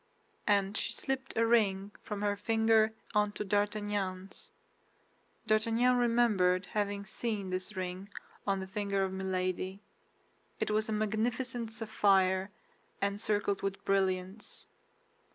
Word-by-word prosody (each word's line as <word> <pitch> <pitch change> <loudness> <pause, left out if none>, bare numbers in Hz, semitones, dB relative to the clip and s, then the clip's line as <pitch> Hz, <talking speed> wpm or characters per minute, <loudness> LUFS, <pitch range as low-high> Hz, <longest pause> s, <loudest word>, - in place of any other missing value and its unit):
and 200 -1 +3
she - - 0
slipped 270 -2 -3
a 230 - +4
ring 205 -4 +2
from 210 -1 -4
her 205 0 +2
finger 220 +1 +3 0.2
onto 210 -1 +1
D'Artagnan's. 205 -2 -2 0.9
D'Artagnan 230 +3 +3
remembered 225 -7 +3
having 205 -1 -1
seen 205 -2 -3
this 185 +3 -3
ring 185 +1 -4 0.4
on 195 -1 +2
the - - -4
finger 200 0 -1
of 190 0 -2
Milady; 185 0 -2 0.8
it - - 0
was 215 +1 +1
a - - -1
magnificent 220 +2 -1
sapphire, 195 -4 +2 0.5
encircled 200 0 0
with 195 0 -3
brilliants. 190 +1 0
205 Hz, 115 wpm, -32 LUFS, 190-220 Hz, 0.9 s, a